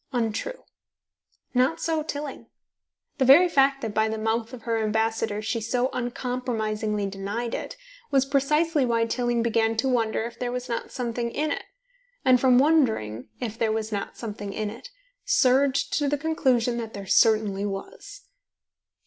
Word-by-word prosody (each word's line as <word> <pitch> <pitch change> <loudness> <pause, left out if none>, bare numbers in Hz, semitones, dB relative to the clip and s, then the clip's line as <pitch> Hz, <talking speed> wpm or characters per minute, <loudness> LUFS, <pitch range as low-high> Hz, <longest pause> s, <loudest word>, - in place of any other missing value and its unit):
untrue. 245 - -2 0.9
Not 255 +5 +2
so 320 -1 0
Tilling. 295 -2 -6 0.7
The - - +4
very 295 +8 +8
fact 275 -4 +2
that, 220 -2 -3
by 220 +1 +2
the 220 - -3
mouth 225 +1 -1
of 250 -3 -10
her 230 -1 0
ambassador, 220 -1 0
she 230 +1 -2
so 245 +3 0
uncompromisingly 225 -4 -2
denied 200 +5 -4
it, - - -5 0.3
was 270 -1 +3
precisely 295 +3 +2
why 230 -2 +2
Tilling 240 0 0
began 225 -1 +1
to 255 +4 +1
wonder 225 -4 +1
if 235 +1 -7
there 245 -1 -2
was 250 0 -4
not 235 - -4
something 240 -2 -3
in 300 +5 -2
it, - - -3 0.6
and 255 -2 +5
from 255 -2 +5
wondering 235 - +2
if 225 -3 -5
there 225 -1 +2
was 220 0 -2
not 200 -1 -4
something 205 -3 -6
in 215 0 -3
it, 230 - -11 0.3
surged 275 - +2
to 290 -1 +1
the 290 - 0
conclusion 260 -6 +1
that 225 -1 -6
there 200 -1 -6
certainly 205 -1 +3
was. 195 - -8
235 Hz, 160 wpm, -25 LUFS, 220-270 Hz, 0.9 s, very